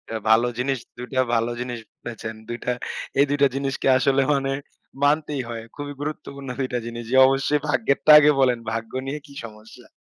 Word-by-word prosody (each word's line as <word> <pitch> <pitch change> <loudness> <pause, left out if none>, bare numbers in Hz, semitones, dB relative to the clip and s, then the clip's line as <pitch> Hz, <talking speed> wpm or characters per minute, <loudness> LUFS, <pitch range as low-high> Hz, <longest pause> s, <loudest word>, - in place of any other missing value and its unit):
এ - - 0
ভালো 115 +2 +5
জিনিস, 135 +1 -1 0.2
২ 125 +1 -7
টা 130 - +3
ভালো 115 +1 +1
জিনিস 125 -1 -4 0.2
বলেছেন। 110 -1 -6
২ 120 - -4
টা 125 - +1 0.5
এই 140 - +6
২ 145 - +1
টা 140 - +7
জিনিসকে 135 0 -2
আসলে 135 +1 +2
মানে 135 -1 0 0.5
মানতেই 150 -1 +1
হয়। 115 -1 -5
খুবই 145 0 -6
গুরুত্বপূর্ণ 140 -2 -6
২ 130 - 0
টা - - +1
জিনিস। 120 0 -6
যে, - - +2
অবশ্যই 135 +2 +1
ভাগ্যেরটা 140 +3 +2
আগে 150 0 +5
বলেন। 125 -3 +3
ভাগ্য 115 0 -4 0.2
নিয়ে 150 +2 -3
কি 140 - -15
সমস্যা? 110 0 -13
130 Hz, 190 wpm, -23 LUFS, 120-140 Hz, 0.5 s, টা